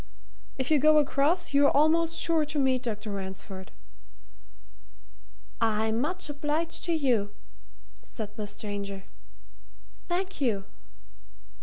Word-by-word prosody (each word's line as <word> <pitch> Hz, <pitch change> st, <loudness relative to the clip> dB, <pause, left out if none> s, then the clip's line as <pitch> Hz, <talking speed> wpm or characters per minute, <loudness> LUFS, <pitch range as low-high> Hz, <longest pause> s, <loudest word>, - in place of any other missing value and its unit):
If 260 Hz, +3 st, -2 dB
you 305 Hz, -, +5 dB
go 305 Hz, +2 st, +5 dB
across, 300 Hz, +4 st, +2 dB
you're 280 Hz, 0 st, +6 dB
almost 325 Hz, +3 st, +3 dB
sure 325 Hz, -2 st, +3 dB
to 300 Hz, 0 st, -4 dB
meet 260 Hz, -2 st, +2 dB
Dr. 215 Hz, -3 st, -4 dB
Ransford." 190 Hz, -1 st, -7 dB, 1.9 s
"I'm 220 Hz, 0 st, +1 dB
much 360 Hz, +6 st, -1 dB
obliged 300 Hz, +3 st, -1 dB
to 340 Hz, -, +1 dB
you," 250 Hz, -10 st, +1 dB, 0.7 s
said 210 Hz, -2 st, -8 dB
the 210 Hz, -2 st, -4 dB
stranger. 200 Hz, -2 st, -5 dB, 1.0 s
"Thank 370 Hz, -1 st, -3 dB
you." 215 Hz, -7 st, +1 dB
275 Hz, 110 wpm, -28 LUFS, 210-310 Hz, 1.9 s, you're